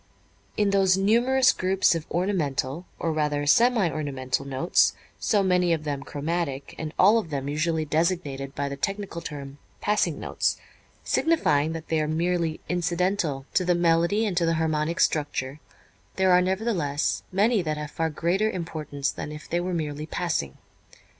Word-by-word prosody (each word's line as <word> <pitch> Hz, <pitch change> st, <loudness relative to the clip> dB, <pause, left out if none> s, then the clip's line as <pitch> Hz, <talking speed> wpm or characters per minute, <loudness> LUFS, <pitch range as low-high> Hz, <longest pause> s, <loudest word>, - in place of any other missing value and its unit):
In 205 Hz, -1 st, +2 dB
those 190 Hz, -1 st, +4 dB
numerous 245 Hz, +6 st, +4 dB
groups 185 Hz, 0 st, +2 dB
of 165 Hz, -2 st, -5 dB
ornamental, 170 Hz, -4 st, -1 dB
or 165 Hz, -, -1 dB
rather 150 Hz, -1 st, 0 dB
semi 230 Hz, +5 st, +4 dB
ornamental, 140 Hz, -3 st, -2 dB
notes, 140 Hz, +6 st, +2 dB, 0.3 s
so 205 Hz, -2 st, +2 dB
many 180 Hz, -2 st, +3 dB
of 160 Hz, -2 st, -2 dB
them 145 Hz, -2 st, -3 dB
chromatic, 145 Hz, -1 st, -3 dB
and 155 Hz, -1 st, -4 dB
all 210 Hz, +5 st, +6 dB
of 200 Hz, -, -6 dB
them 140 Hz, -2 st, -3 dB
usually 155 Hz, +2 st, 0 dB
designated 150 Hz, -4 st, -1 dB
by 140 Hz, -, -2 dB
the 140 Hz, -, -4 dB
technical 195 Hz, +3 st, -3 dB
term 140 Hz, -3 st, -8 dB, 0.2 s
"passing 200 Hz, -7 st, 0 dB
notes," -, -, -1 dB, 0.5 s
signifying 160 Hz, -, +2 dB
that 165 Hz, 0 st, -7 dB
they 160 Hz, -1 st, +1 dB
are 155 Hz, -, -1 dB
merely 165 Hz, 0 st, 0 dB
incidental 175 Hz, -5 st, -1 dB
to 185 Hz, -, +2 dB
the 180 Hz, 0 st, +2 dB
melody 170 Hz, +5 st, +2 dB
and 200 Hz, -4 st, -2 dB
to 170 Hz, -, +3 dB
the 165 Hz, -, +2 dB
harmonic 160 Hz, +1 st, 0 dB
structure, 145 Hz, -2 st, 0 dB, 0.6 s
there 190 Hz, -1 st, +3 dB
are 180 Hz, 0 st, +6 dB
nevertheless 185 Hz, -7 st, 0 dB
many 210 Hz, +3 st, +3 dB
that 155 Hz, -3 st, -2 dB
have 150 Hz, -1 st, -6 dB
far 165 Hz, 0 st, -1 dB
greater 175 Hz, +7 st, 0 dB
importance 155 Hz, -6 st, -3 dB
than 150 Hz, -, -6 dB
if 150 Hz, 0 st, -9 dB
they 175 Hz, -, 0 dB
were 180 Hz, +1 st, -2 dB
merely 155 Hz, -3 st, -3 dB
"passing." 160 Hz, -, -2 dB
165 Hz, 160 wpm, -25 LUFS, 150-185 Hz, 0.6 s, all